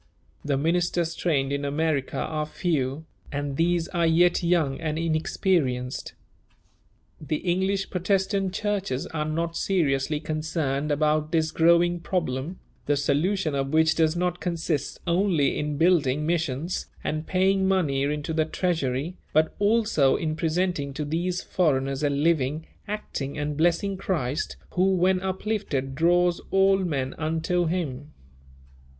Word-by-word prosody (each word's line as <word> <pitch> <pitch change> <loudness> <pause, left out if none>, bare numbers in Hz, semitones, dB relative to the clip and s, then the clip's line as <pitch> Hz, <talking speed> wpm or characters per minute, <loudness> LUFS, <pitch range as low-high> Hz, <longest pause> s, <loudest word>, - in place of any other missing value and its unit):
The 145 -2 0
ministers 170 +2 0
trained 140 -6 0
in 140 0 -2
America 145 -1 -1
are 155 -1 -2
few, 155 -3 -1 0.3
and 145 -1 -3
these 170 +2 +1
are 170 -2 +1
yet 175 +2 +4
young 170 -6 +1
and 155 -1 -2
inexperienced. 155 -5 -1 1.1
The 155 0 -2
English 190 +4 -1
Protestant 195 +1 0
churches 195 -9 -2
are 150 -1 -3
not 165 +2 -2
seriously 150 -6 +1
concerned 155 -2 -2
about 150 +1 +1
this 160 -1 +1
growing 170 +2 +4
problem, 165 -2 -2 0.3
the 145 0 +2
solution 155 +4 +1
of 135 +1 -2
which 160 0 +4
does 160 0 +2
not 180 0 -1
consist 165 -4 -2
only 170 -5 +2
in 150 -1 -2
building 150 -4 +3
missions 165 0 -1 0.2
and 155 +1 -3
paying 190 +1 +2
money 165 -8 +1
into 150 +3 -1
the 160 -1 +2
treasury, 160 -2 -1 0.2
but 155 +1 +3
also 205 -10 +3
in 155 -2 -2
presenting 160 -3 -1
to 150 - -3
these 175 +4 -2
foreigners 135 -5 0
a 145 - +2
living, 150 0 +1 0.2
acting, 195 -9 -4
and 150 0 -2
blessing 175 +5 +1
Christ, 155 -7 -2
who, 190 +1 +2
when 185 +1 +3
uplifted, 190 -8 -2
draws 175 +3 +2
all 195 0 +4
men 140 -8 -2
unto 165 +2 0
Him. 150 -4 -3
160 Hz, 130 wpm, -25 LUFS, 145-180 Hz, 1.1 s, yet